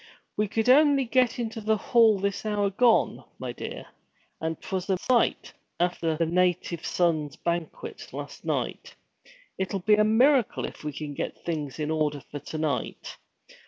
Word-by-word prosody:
'We 210 Hz, -, +1 dB
could 225 Hz, +3 st, -1 dB
only 280 Hz, 0 st, +5 dB
get 250 Hz, +1 st, +2 dB
into 225 Hz, -2 st, -4 dB
the 215 Hz, +1 st, +2 dB
hall 225 Hz, 0 st, +4 dB
this 200 Hz, 0 st, -2 dB
hour 205 Hz, -2 st, 0 dB
gone, 235 Hz, +3 st, +3 dB
my -, -, -5 dB
dear, -, -, -7 dB, 0.6 s
and 160 Hz, 0 st, -2 dB
't -, -, -11 dB
was 185 Hz, +1 st, -2 dB
a 190 Hz, -, +2 dB
sight, 245 Hz, +6 st, +1 dB, 0.3 s
after 170 Hz, -2 st, 0 dB
the 165 Hz, -, +2 dB
Native 175 Hz, -1 st, 0 dB
Sons' 155 Hz, -5 st, 0 dB
Banquet 170 Hz, -1 st, -4 dB
last -, -, -8 dB
night. -, -, -3 dB, 0.6 s
It'll 190 Hz, +1 st, -1 dB
be 210 Hz, +4 st, +3 dB
a 210 Hz, 0 st, +5 dB
miracle 245 Hz, +3 st, +3 dB
if -, -, -9 dB
we 150 Hz, -, -3 dB
get 145 Hz, 0 st, -6 dB
things 150 Hz, -5 st, -3 dB
in 155 Hz, 0 st, -2 dB
order 150 Hz, -3 st, -1 dB
for 145 Hz, -, -5 dB
to 155 Hz, -, -7 dB
night. 155 Hz, -2 st, -3 dB
185 Hz, 160 wpm, -27 LUFS, 160-220 Hz, 0.6 s, only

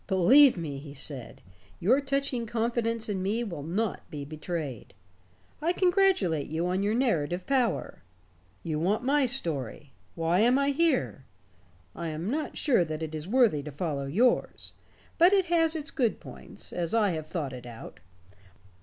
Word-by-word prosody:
"Believe 240 Hz, +8 st, +6 dB
me," 150 Hz, -5 st, -5 dB
he 140 Hz, 0 st, -11 dB
said, 135 Hz, -3 st, -6 dB, 0.4 s
"your 250 Hz, +11 st, +3 dB
touching 275 Hz, -4 st, -1 dB
confidence 230 Hz, 0 st, -1 dB
in 200 Hz, -3 st, -2 dB
me 210 Hz, +5 st, -1 dB
will 175 Hz, -10 st, -6 dB
not 190 Hz, +8 st, -2 dB
be 145 Hz, -4 st, -6 dB
betrayed. 155 Hz, -, -6 dB, 0.7 s
I 335 Hz, +3 st, +1 dB
congratulate 360 Hz, -, +2 dB
you 160 Hz, +3 st, -2 dB
on 185 Hz, +2 st, 0 dB
your 205 Hz, +2 st, +1 dB
narrative 180 Hz, -, 0 dB
power. 260 Hz, -4 st, 0 dB, 0.6 s
You 155 Hz, -2 st, -2 dB
want 200 Hz, +8 st, 0 dB
my 275 Hz, +1 st, +2 dB
story. 150 Hz, -, -4 dB, 0.2 s
Why 165 Hz, +2 st, +1 dB
am 240 Hz, +4 st, +4 dB
I 280 Hz, 0 st, +2 dB
here? 280 Hz, -, 0 dB, 0.7 s
I 170 Hz, -, -4 dB
am 160 Hz, +6 st, -3 dB
not 305 Hz, +2 st, -3 dB
sure 255 Hz, -, +3 dB
that 155 Hz, -1 st, -5 dB
it 160 Hz, 0 st, -5 dB
is 155 Hz, +1 st, -5 dB
worthy 225 Hz, -, +3 dB
to 150 Hz, +1 st, -8 dB
follow 145 Hz, -2 st, -3 dB
yours. 230 Hz, -, +1 dB, 0.5 s
But 350 Hz, +4 st, +6 dB
it 385 Hz, -2 st, +4 dB
has 325 Hz, -1 st, +3 dB
its 310 Hz, 0 st, -4 dB
good 245 Hz, -7 st, 0 dB
points -, -, -11 dB
as 175 Hz, +3 st, -2 dB
I 210 Hz, -4 st, +3 dB
have 155 Hz, -2 st, -4 dB
thought 155 Hz, -5 st, -4 dB
it 125 Hz, -1 st, -9 dB
out." 115 Hz, -2 st, -10 dB
190 Hz, 165 wpm, -28 LUFS, 155-255 Hz, 0.7 s, Believe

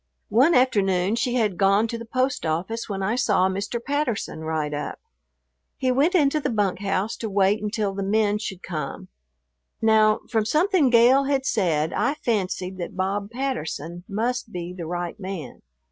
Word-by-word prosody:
One 265 Hz, +11 st, +4 dB
afternoon 200 Hz, -6 st, +2 dB
she 245 Hz, +1 st, 0 dB
had 210 Hz, -7 st, 0 dB
gone 200 Hz, +3 st, +4 dB
to 235 Hz, -, -3 dB
the 230 Hz, -, -7 dB
post 255 Hz, +2 st, 0 dB
office 180 Hz, +9 st, -2 dB
when 195 Hz, -1 st, -3 dB
I 215 Hz, +5 st, 0 dB
saw 240 Hz, -6 st, +2 dB
Mr. 200 Hz, +5 st, -3 dB
Patterson 255 Hz, -, -2 dB
ride 155 Hz, -2 st, -2 dB
up. 145 Hz, -, -4 dB, 0.8 s
He 255 Hz, -, +1 dB
went 290 Hz, +9 st, +2 dB
into 305 Hz, -2 st, +3 dB
the 285 Hz, -, -2 dB
bunk 205 Hz, -5 st, 0 dB
house 200 Hz, +1 st, -1 dB
to 225 Hz, -, -4 dB
wait 200 Hz, +1 st, +2 dB
until 210 Hz, -1 st, -1 dB
the 195 Hz, -, -4 dB
men 210 Hz, +1 st, +1 dB
should 190 Hz, -3 st, -6 dB
come. 155 Hz, -5 st, -5 dB, 0.7 s
Now, 220 Hz, -1 st, +4 dB
from 220 Hz, -2 st, +1 dB
something 315 Hz, -, +3 dB
Gale 245 Hz, +3 st, +5 dB
had 270 Hz, -1 st, 0 dB
said 165 Hz, -, +1 dB
I 285 Hz, -, +1 dB
fancied 190 Hz, -8 st, -2 dB
that 175 Hz, -, -6 dB
Bob 200 Hz, +2 st, -1 dB
Patterson 175 Hz, -, -4 dB
must 230 Hz, +3 st, -2 dB
be 175 Hz, -1 st, -5 dB
the 170 Hz, -3 st, -6 dB
right 175 Hz, +3 st, -4 dB
man. 185 Hz, -, -7 dB
210 Hz, 170 wpm, -24 LUFS, 185-245 Hz, 0.8 s, Gale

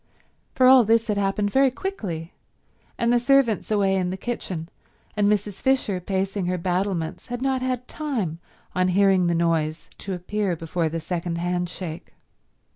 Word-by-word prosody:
For 255 Hz, -, +4 dB
all 255 Hz, -1 st, +8 dB
this 225 Hz, +1 st, +3 dB
had 210 Hz, -2 st, -1 dB
happened 200 Hz, +1 st, 0 dB
very 270 Hz, +2 st, +4 dB
quickly, 200 Hz, -, -5 dB, 0.6 s
and 235 Hz, +1 st, +2 dB
the 240 Hz, -, +4 dB
servants 250 Hz, -3 st, +2 dB
away 200 Hz, -3 st, +2 dB
in 185 Hz, -2 st, 0 dB
the 185 Hz, -, -4 dB
kitchen, 185 Hz, -7 st, -4 dB, 0.5 s
and 205 Hz, -1 st, +3 dB
Mrs. 205 Hz, -1 st, -1 dB
Fisher 260 Hz, -8 st, +1 dB
pacing 190 Hz, +1 st, -2 dB
her 180 Hz, 0 st, 0 dB
battlements, 180 Hz, -1 st, -2 dB
had 245 Hz, -1 st, -4 dB
not 265 Hz, -1 st, +1 dB
had 255 Hz, -1 st, -2 dB
time 225 Hz, -, -3 dB, 0.3 s
on 185 Hz, 0 st, +2 dB
hearing 190 Hz, -1 st, +4 dB
the 170 Hz, -, +1 dB
noise 165 Hz, -2 st, 0 dB
to 195 Hz, -1 st, -4 dB
appear 190 Hz, +1 st, -2 dB
before 165 Hz, 0 st, -2 dB
the 165 Hz, +1 st, -3 dB
second 170 Hz, +1 st, -3 dB
handshake. 175 Hz, -1 st, -4 dB
195 Hz, 160 wpm, -24 LUFS, 175-230 Hz, 0.6 s, all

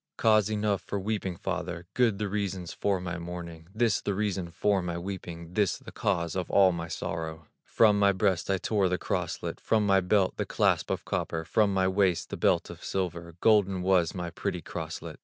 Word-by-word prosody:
"Cause 110 Hz, -2 st, +4 dB
enough 105 Hz, -2 st, 0 dB
for 100 Hz, -, -4 dB
weeping, 95 Hz, -3 st, -2 dB
father, 90 Hz, -2 st, -4 dB
Good 120 Hz, -5 st, +2 dB
the 105 Hz, 0 st, -2 dB
reasons 95 Hz, -3 st, -3 dB
for 100 Hz, -2 st, 0 dB
my 90 Hz, -1 st, -4 dB
mourning, 85 Hz, -1 st, -7 dB
This, 115 Hz, +1 st, +1 dB
the 100 Hz, -, -1 dB
reason 100 Hz, -4 st, -1 dB
for 95 Hz, +3 st, +1 dB
my 85 Hz, -1 st, -3 dB
weeping, 85 Hz, -2 st, -6 dB
This, 100 Hz, -2 st, +1 dB
the -, -, -11 dB
cause 85 Hz, -4 st, -1 dB
of 90 Hz, -2 st, -2 dB
all 95 Hz, -2 st, +5 dB
my 85 Hz, -1 st, -4 dB
sorrow: 80 Hz, -1 st, -5 dB, 0.2 s
From 105 Hz, -3 st, +4 dB
my 100 Hz, -1 st, +5 dB
breast 95 Hz, -3 st, 0 dB
I 95 Hz, -, +2 dB
tore 100 Hz, -1 st, +1 dB
the 90 Hz, -, 0 dB
crosslet, -, -, -3 dB
From 110 Hz, -2 st, +2 dB
my 95 Hz, -1 st, +5 dB
belt, 95 Hz, +1 st, +2 dB
the -, -, -1 dB
clasp -, -, +1 dB
of -, -, -2 dB
copper, 80 Hz, 0 st, -2 dB
From 105 Hz, +3 st, +2 dB
my 95 Hz, -1 st, +2 dB
waist, 95 Hz, -2 st, +1 dB
the -, -, -2 dB
belt -, -, +2 dB
of -, -, -12 dB
silver, 85 Hz, -3 st, -3 dB
Golden 100 Hz, -4 st, +3 dB
was 90 Hz, -2 st, +2 dB
my 90 Hz, -2 st, -4 dB
pretty 85 Hz, 0 st, -3 dB
crosslet." -, -, -6 dB
95 Hz, 195 wpm, -28 LUFS, 85-100 Hz, 0.2 s, all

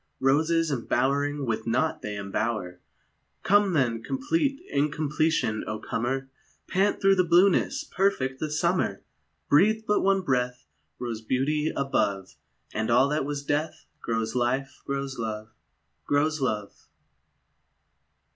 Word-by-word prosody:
Roses 160 Hz, +4 st, +2 dB
embowering 140 Hz, +3 st, 0 dB
with 110 Hz, -1 st, -2 dB
naught 155 Hz, +7 st, 0 dB
they 105 Hz, -1 st, -4 dB
embower! 100 Hz, -2 st, -3 dB, 0.6 s
Come 205 Hz, -1 st, +4 dB
then, 120 Hz, -7 st, +1 dB
complete 275 Hz, -, -1 dB
incompletion, 150 Hz, -4 st, 0 dB
O 110 Hz, -, -3 dB
comer, 130 Hz, +5 st, -2 dB, 0.4 s
Pant 195 Hz, +3 st, +1 dB
through 195 Hz, 0 st, +5 dB
the 185 Hz, -1 st, +3 dB
blueness, 190 Hz, -, +3 dB
perfect 180 Hz, -, 0 dB
the 155 Hz, -, -2 dB
summer! 160 Hz, -, 0 dB, 0.4 s
Breathe 215 Hz, +9 st, +4 dB
but 210 Hz, -, +2 dB
one 195 Hz, 0 st, +2 dB
breath 125 Hz, -3 st, -1 dB, 0.3 s
Rose 115 Hz, -3 st, -4 dB
beauty 145 Hz, +6 st, 0 dB
above, 100 Hz, -8 st, -1 dB, 0.4 s
And 110 Hz, +1 st, -1 dB
all 125 Hz, +4 st, +4 dB
that 150 Hz, -1 st, 0 dB
was 145 Hz, -1 st, -4 dB
death 155 Hz, +2 st, -2 dB, 0.2 s
Grows 115 Hz, -1 st, -2 dB
life, 125 Hz, +2 st, -1 dB
grows 140 Hz, -2 st, -3 dB
love, 110 Hz, -1 st, -4 dB, 0.6 s
Grows 155 Hz, +1 st, +1 dB
love! 105 Hz, -6 st, -3 dB
140 Hz, 120 wpm, -26 LUFS, 120-165 Hz, 0.6 s, through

